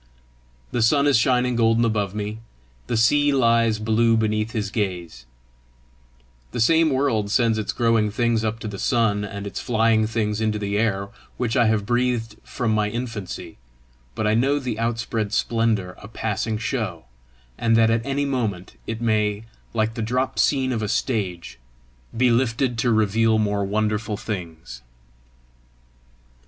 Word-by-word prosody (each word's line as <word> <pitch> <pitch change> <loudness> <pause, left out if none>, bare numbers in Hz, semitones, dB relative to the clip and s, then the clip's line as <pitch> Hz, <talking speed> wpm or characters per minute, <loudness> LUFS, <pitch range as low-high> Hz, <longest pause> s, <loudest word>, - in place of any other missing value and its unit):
The 120 - -1
sun 140 +6 +4
is 145 - +4
shining 125 +1 +2
golden 115 0 +3
above 105 -3 -1
me; 105 +1 -4 0.5
the 115 - 0
sea 145 +6 +4
lies 115 -4 +3
blue 115 +1 +2
beneath 110 0 0
his 105 -4 -3
gaze; 90 - -4 1.2
the - - -4
same 160 +7 +4
world 130 -7 0
sends 115 0 +2
its 105 - -2
growing 115 -2 +2
things 115 +1 0
up 110 0 -1
to - - -5
the 100 -2 -6
sun, 110 -5 +1
and 100 0 -6
its 100 - -5
flying 110 -1 +2
things 110 -1 -1
into 110 -1 0
the 100 -1 -3
air 100 -2 0 0.3
which 120 -2 -1
I 120 -3 +4
have 110 -2 +1
breathed 120 -2 -1
from 115 -3 -2
my 105 -1 +1
infancy; 115 - -6 0.6
but - - -2
I 105 - +2
know 135 +6 +2
the 125 -6 -4
outspread 115 -2 -2
splendour 110 -6 0
a 100 - -10
passing 110 0 -2
show, 110 - -3 0.5
and 115 - +2
that 115 0 +4
at 115 0 +1
any 140 +2 -1
moment 105 - -3
it 115 - -4
may, 105 -2 0 0.3
like 110 -1 0
the 115 - -4
drop 125 +4 -1
scene 135 -2 +2
of 115 -3 -1
a 105 - -2
stage, 105 - -2 0.6
be 125 0 +4
lifted 120 +1 +1
to 120 +1 +2
reveal 110 +1 +2
more 105 -2 0
wonderful 105 +1 -1
things. 85 - -7
110 Hz, 155 wpm, -23 LUFS, 105-120 Hz, 1.2 s, sun